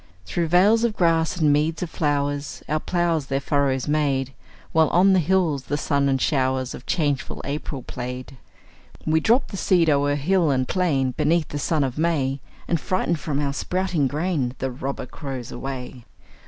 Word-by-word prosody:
Through 170 - -1
vales 200 +7 +4
of 230 -3 +1
grass 165 -1 +2
and 150 -4 +3
meads 155 +3 0
of 175 - -4
flowers, 145 -1 -1
Our 155 +1 0
ploughs 170 -4 0
their 135 0 0
furrows 140 -2 0
made, 140 -3 0 0.4
While 160 -1 +4
on 190 +3 +5
the 190 - +4
hills 165 -5 +1
the 145 - -1
sun 140 -2 +1
and 135 -1 +1
showers 130 -2 0
Of - - -10
changeful 145 -6 -1
April 140 -2 -4
played. 125 +1 -6 0.7
We 160 0 +3
dropped 235 - +2
the 195 - -6
seed 175 -4 +3
o'er 145 0 +2
hill 170 +3 +2
and 130 -2 +1
plain, 145 -9 +1
Beneath 155 +5 +1
the 145 - -4
sun 155 0 +1
of 130 +1 -3
May, 140 -5 0 0.3
And 170 -3 0
frightened 175 -3 0
from 145 -2 -2
our 140 -1 -1
sprouting 180 -2 0
grain 145 -4 -1
The 135 0 -2
robber 135 +2 -4
crows 130 -2 -7
away. 130 -2 -6
145 Hz, 175 wpm, -23 LUFS, 135-170 Hz, 0.7 s, on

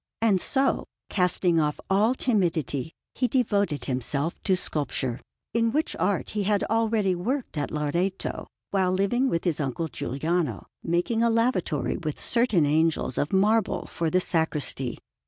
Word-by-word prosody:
And 210 -5 +3
so, 270 0 +1 0.2
casting 180 -2 +2
off 150 -1 0
all 210 +6 +3
timidity, 165 - 0 0.2
he 250 - +1
devoted 205 - +1
himself 140 +5 -1
to 190 - +2
sculpture, 135 -7 -1 0.3
in 230 0 +2
which 305 +5 0
art 185 +3 0
he 210 - -1
had 205 0 +1
already 220 -3 +1
worked 235 +9 -2
at 145 -1 -2
Loreto 170 +6 -2 0.2
while 190 -2 +2
living 220 +8 +1
with 165 - -1
his 170 -5 0
uncle 145 +3 -2
Giuliano, 155 - -2 0.2
making 175 +7 0
a 235 - +4
lavatory 230 - +1
with 155 -3 -4
certain 230 -9 +3
angels 155 -3 +1
of 145 - -1
marble 210 +2 +2
for 165 -1 -2
the 185 - +3
sacristy. 150 -8 -1
180 Hz, 145 wpm, -26 LUFS, 155-220 Hz, 0.3 s, a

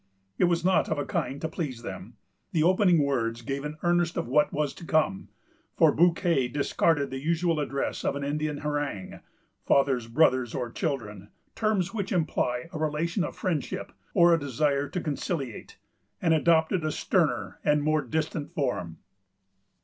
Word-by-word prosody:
It - - +5
was 170 0 +1
not 185 0 +3
of 160 - 0
a 145 - -2
kind 140 - -2
to 160 - -1
please 145 -8 -5
them. - - -8 0.4
The 155 - +3
opening 180 -2 +4
words 115 -4 -1
gave 135 +3 -3
an 150 +1 -5
earnest 175 -1 +2
of - - -2
what 150 +4 +3
was 150 -1 -1
to - - -12
come; 155 -13 0 0.5
for - - +6
Bouquet 170 -5 +3
discarded 140 +2 +1
the 130 0 -4
usual 165 +1 +1
address 140 -2 -2
of - - 0
an 140 - -4
Indian 150 +1 -2
harangue: 145 -10 -3 0.4
fathers, 135 -4 +2
brothers, 130 -1 +2
or 120 -2 -3
children,——terms 145 - -3
which 200 -2 -3
imply 155 -7 0
a 155 - -4
relation 160 +4 0
of - - -4
friendship, 165 -8 -3 0.2
or 170 0 +6
a 165 - +3
desire 140 +1 0
to 180 - -3
conciliate,——and 150 - -4
adopted 160 +2 +3
a 155 - 0
sterner - - 0
and 150 0 +2
more 155 0 +2
distant 155 +4 -3
form. 100 - -2
150 Hz, 155 wpm, -27 LUFS, 135-170 Hz, 0.5 s, for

